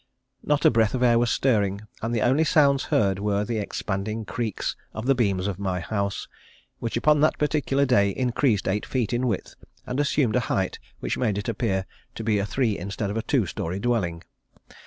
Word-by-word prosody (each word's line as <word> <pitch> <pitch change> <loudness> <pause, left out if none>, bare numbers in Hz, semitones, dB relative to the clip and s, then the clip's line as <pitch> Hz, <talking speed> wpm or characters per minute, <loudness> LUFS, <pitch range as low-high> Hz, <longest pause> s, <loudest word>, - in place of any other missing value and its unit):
Not 150 -1 0
a - - +7
breath 115 0 +2
of 125 - 0
air 120 -1 +5
was 120 0 +2
stirring, 105 -7 +1 0.2
and 115 - -2
the 115 -2 0
only 135 +6 +3
sounds 140 -3 +3
heard 100 -2 +1
were 105 0 0
the 115 0 -2
expanding 105 +2 -3
creaks 110 -1 -3 0.2
of 110 - -4
the 135 - +4
beams 100 -7 0
of 100 -2 -3
my 95 -2 -1
house, 100 +2 -2 0.5
which 115 0 -2
upon 150 +4 +4
that 155 - +3
particular 145 -2 +1
day 100 -7 +3
increased 120 -1 0
eight 105 +2 0
feet 125 -3 -1
in 125 +1 +1
width 105 -6 -2 0.3
and 125 +3 -3
assumed 140 -6 +2
a - - +4
height 95 -1 -1 0.2
which - - -2
made 110 -5 +1
it 100 - -4
appear 100 -4 -1 0.3
to 115 - -5
be 105 -2 +2
a 100 - -1
three 110 -1 0
instead 100 +2 -3
of 105 - -3
a - - 0
two 125 -2 +1
story 85 +2 -4
dwelling. 100 -8 -1
110 Hz, 200 wpm, -25 LUFS, 100-125 Hz, 0.5 s, a